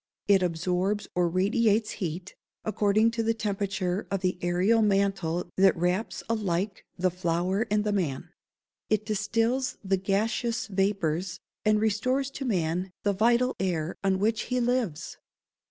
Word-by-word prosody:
It 200 -2 +5
absorbs 180 +4 0
or 175 -1 +2
radiates 210 +4 +2
heat, 180 +1 -5 0.3
according 215 +1 +2
to 230 0 -2
the 225 0 +1
temperature 195 -3 -2
of 195 -2 -1
the 180 -1 -1
ærial 185 +6 +3
mantle 195 -4 0
that 190 -1 +5
wraps 180 +6 -1
alike 200 -3 -1
the 185 0 +1
flower 180 +5 0
and 210 0 +2
the 210 - 0
man. 160 -10 -2 0.6
It 215 0 +1
distills 225 +5 0
the 195 0 +1
gaseous 225 +5 0
vapours, 190 -4 -1 0.2
and 215 0 +3
restores 255 +6 0
to 275 - -5
man 180 -4 0
the 205 - +2
vital 235 +5 +2
air 175 -4 -1
on 190 -1 +2
which 220 +3 0
he 250 0 +1
lives. 235 -10 -1
195 Hz, 140 wpm, -27 LUFS, 180-220 Hz, 0.6 s, It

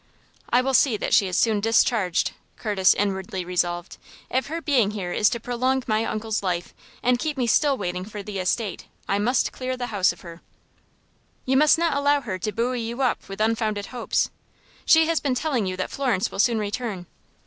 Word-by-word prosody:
"I 245 - +4
will 270 +1 0
see 245 -3 +4
that - - -2
she 195 - +5
is 180 - -2
soon 220 -3 +3
discharged," 220 -3 +2 0.3
Curtis 200 -4 +3
inwardly 190 -2 -2
resolved. 175 0 -2 0.3
"If 260 0 0
her 325 +3 -3
being 270 -10 +2
here 195 -4 -4
is 210 - +3
to 235 - -3
prolong 255 +3 0
my 215 0 +1
uncle's 220 0 -2
life, 175 -3 -2 0.3
and 245 0 +3
keep 305 0 -2
me 250 - +1
still 275 +4 +3
waiting 180 -2 -3
for 205 0 -8
the 200 -1 -5
estate, 190 +2 -2 0.2
I 200 - +1
must 245 +5 +1
clear 255 0 -4
the 245 -3 -5
house 195 -2 +3
of - - -13
her." 170 -2 -11 1.0
"You 265 - +1
must 300 +3 +5
not 335 -3 +1
allow 285 0 +2
her 190 -7 -5
to 210 +4 -2
buoy 240 +3 -1
you 235 +4 -3
up 250 - -1
with 195 - -7
unfounded 215 -2 0
hopes. 245 - 0 0.6
She 320 0 +6
has 330 0 +1
been 270 -3 -1
telling 250 -7 0
you 185 0 -3
that 185 - -3
Florence 245 -7 0
will - - -7
soon 230 +2 +3
return." 210 -3 -3
225 Hz, 200 wpm, -24 LUFS, 195-255 Hz, 1.0 s, She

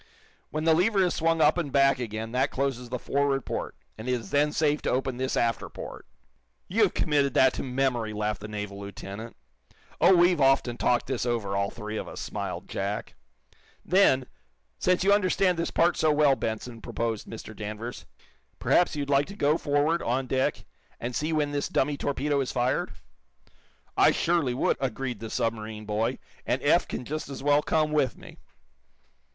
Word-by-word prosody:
When 155 +1 -3
the 160 0 +5
lever 190 +4 +3
is 180 - +1
swung 165 0 +1
up 155 +3 +4
and 150 -5 -3
back 135 -1 +4
again 110 -1 -4
that 130 +3 +1
closes 130 -3 -2
the 125 - -2
forward 140 +1 0
port, - - -4 0.2
and 115 +4 -5
it - - +2
is 115 -5 -4
then 145 +1 +3
safe 150 -1 +1
to - - -1
open 130 -1 -1
this 130 +1 -1
after 115 -1 0
port." - - -9 0.6
"You've 210 0 +2
committed 140 -4 +1
that 130 -1 +5
to - - -4
memory," 125 -4 0
laughed 105 -1 -2
the 105 - -6
naval 105 -1 -5
lieutenant. 100 +3 -8 0.7
"Oh, 180 +3 +7
we've 175 -2 +4
often 135 -3 +3
talked 120 0 +1
this 130 -2 -2
over, 115 -5 -1
all 100 0 0
three 110 -1 -6
of - - -4
us," - - -8
smiled - - -5
Jack. 100 +2 -3 0.7
"Then, 155 -8 +4 0.5
since 180 0 +2
you 200 +1 +5
understand 185 -3 +2
this 170 - -1
part 170 +1 +2
so 155 - +3
well, 145 -2 +4
Benson," 115 0 -4
proposed 115 -2 -3
Mr. 110 -1 -9
Danvers, 110 +3 -6 0.5
"perhaps 175 - +2
you'd 145 -1 -2
like 140 0 +2
to 200 - -9
go 150 -5 +2
forward, 150 +2 +1
on 130 +3 0
deck, 130 +1 -1 0.3
and 120 +1 -4
see 155 +2 -1
when 150 -2 +1
this 145 0 -2
dummy 145 +2 +1
torpedo 140 0 0
is 130 - -2
fired?" 125 -2 0 1.0
"I - - +6
surely 165 -8 +1
would," - - +1
agreed 130 -3 -3
the 115 - -6
submarine 110 -1 -3
boy 105 +2 -1 0.3
"And - - 0
Eph - - +3
can - - -5
just 155 +3 -4
as 135 -1 -7
well 145 +1 +4
come 155 0 +1
with 145 -5 +1
me." - - -13
135 Hz, 180 wpm, -27 LUFS, 115-150 Hz, 1.0 s, Oh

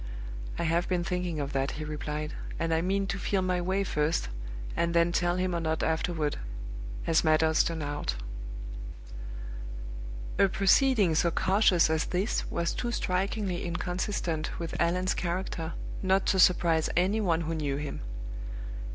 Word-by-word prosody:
"I - - -1
have 170 +2 +1
been 180 -2 +1
thinking 180 -3 -1
of 140 -1 -3
that," 135 0 0
he 155 - -4
replied; 150 0 -3 0.2
"and 165 -1 0
I 160 - +3
mean 195 +3 +1
to 195 0 -2
feel 190 0 +1
my 180 -1 +1
way 190 +3 +1
first, 150 - 0 0.5
and 170 0 +1
then 170 0 +4
tell 175 0 +2
him 185 0 0
or - - +1
not 160 -1 0
afterward, 160 -2 0 0.7
as 165 - +3
matters 160 0 +4
turn 165 -2 -2
out?" 145 - -2 2.2
A 200 - +7
proceeding 200 - +4
so 165 +2 +3
cautious 190 0 +4
as 160 0 +1
this 190 +5 -1
was 170 0 0
too 240 - -2
strikingly 190 -2 -1
inconsistent 175 -2 -2
with 170 -1 -4
Allan's 180 +2 +2
character 170 -2 -2 0.3
not 190 0 +3
to 190 - +3
surprise 170 -3 +5
any 195 +5 +3
one 170 -5 +2
who 165 0 -2
knew 150 -4 -1
him. 145 -1 -4
170 Hz, 150 wpm, -29 LUFS, 160-185 Hz, 2.2 s, A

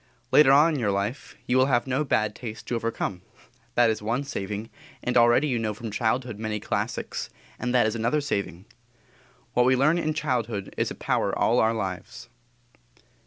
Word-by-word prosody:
Later 150 -3 +7
on 150 +4 +6
in 145 - -1
your 110 -4 0
life 100 +6 -3
you 125 - +2
will 130 0 +4
have 120 -3 +2
no 135 +3 0
bad 110 -6 +1
taste 110 -1 -8
to 120 - -2
overcome 115 -5 -3 0.5
that 120 -2 +5
is 110 - -4
one 115 +6 -1
saving; 105 -5 -5 0.3
and 125 - -1
already 120 +4 +5
you 125 -4 0
know 110 -2 -2
from 115 0 -6
childhood 115 0 -1
many 110 -1 -3
classics, - - -3 0.3
and 125 - -2
that 120 - +5
is 110 - 0
another 120 +6 0
saving. 100 - -3 0.9
What 125 0 +3
we 130 - +5
learn 155 +6 +3
in 155 -2 -1
childhood 120 -9 -2
is - - 0
a - - -6
power - - -1
all - - +3
our 110 +1 +2
lives. 95 -4 -5
120 Hz, 185 wpm, -26 LUFS, 110-130 Hz, 0.9 s, Later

